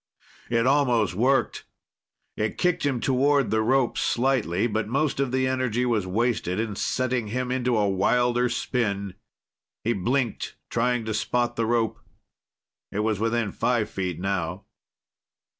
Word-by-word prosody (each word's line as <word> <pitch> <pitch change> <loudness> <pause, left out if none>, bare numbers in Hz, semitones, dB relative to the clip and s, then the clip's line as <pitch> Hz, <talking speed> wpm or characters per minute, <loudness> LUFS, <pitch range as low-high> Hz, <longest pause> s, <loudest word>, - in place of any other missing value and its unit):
It 115 0 +2
almost 125 -7 +3
worked. 130 +8 +1 0.7
It 110 0 -2
kicked 180 -5 +1
him 130 -4 -1
toward 140 +1 +2
the 110 0 +2
rope 130 +2 +2
slightly, 120 -7 +1
but 110 -2 -1
most 140 +4 0
of 135 -2 0
the 130 0 +1
energy 130 -2 0
was 110 -6 0
wasted 105 -2 0
in 110 -2 -2
setting 125 0 -1
him 125 +3 -2
into 125 -2 +1
a 105 -1 +2
wilder 120 +5 +2
spin. 100 -7 -2 0.7
He 115 - +1
blinked, 120 +4 -1 0.2
trying 120 0 +1
to 110 - -2
spot 120 +3 0
the 115 -1 0
rope. 115 -1 0 0.9
It 105 - -1
was 110 -2 0
within 115 -1 0
five 120 -3 0
feet 90 -3 -3
now. 90 -1 -2
120 Hz, 140 wpm, -25 LUFS, 105-125 Hz, 0.9 s, almost